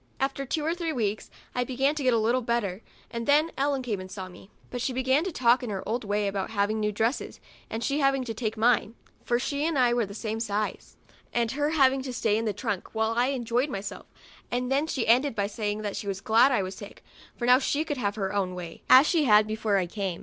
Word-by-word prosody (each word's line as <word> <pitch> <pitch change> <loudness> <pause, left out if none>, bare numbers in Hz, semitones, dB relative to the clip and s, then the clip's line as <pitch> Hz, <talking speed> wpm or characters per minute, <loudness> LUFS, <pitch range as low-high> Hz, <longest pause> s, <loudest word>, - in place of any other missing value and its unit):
After 275 0 -2
two 300 +3 -1
or 325 - +1
three 340 -2 -3
weeks 220 -6 -2 0.2
I 250 - 0
began 265 +3 0
to 310 - -4
get 260 -2 +3
a 230 - +3
little 235 +3 +2
better, 230 -5 -1 0.3
and 235 -1 -4
then 300 +3 +4
Ellen 275 -1 0
came 215 -6 -2
and 185 0 -8
saw 190 -1 -6
me; 185 +2 -14 0.2
but 245 - -4
she 255 - -1
began 260 +4 +2
to 380 - -2
talk 245 -4 +3
in 245 - -5
her 195 -2 -4
old 230 +3 -1
way 205 0 0
about 195 -1 -2
my 220 - -10
having 205 +2 +1
new 210 0 0
dresses, 225 +5 -2 0.3
and 225 +1 -4
she 280 +5 0
having 275 -2 +2
to 230 -2 -4
take 220 -1 -3
mine, 230 0 +2 0.3
(for 240 - +1
she 285 +3 -2
and 320 -2 0
I 245 -2 +4
were 240 - +1
of 215 - -1
the 200 - -9
same 220 0 -3
size,) 210 -1 -3 0.3
and 235 -1 0
her 290 +2 0
having 270 -4 +3
to 260 -1 -5
stay 220 -3 +1
in 225 +1 -1
the 215 - +1
trunk 205 0 -4
while 220 0 +1
I 245 +2 +3
enjoyed 250 0 0
myself, 195 -5 -6 0.4
and 250 +1 -2
then 280 +3 +2
she 265 -7 -1
ended 250 +3 +3
by 200 - 0
saying 210 0 -3
that 205 -2 -3
she 200 - -5
was 195 -1 -2
glad 225 +6 +4
I 225 -6 +2
was 185 +1 -5
sick, 200 +1 -11 0.3
for 240 - -2
now 250 +1 +6
she 285 +2 0
could 290 -3 -3
have 205 -4 -1
her 195 -2 -2
own 190 -3 -1
way, 170 -2 -8
as 260 +3 +9
she 320 -2 +2
had 210 -3 +6
before 215 -1 0
I 185 - +1
came. 190 -1 -4
235 Hz, 260 wpm, -27 LUFS, 210-265 Hz, 0.4 s, as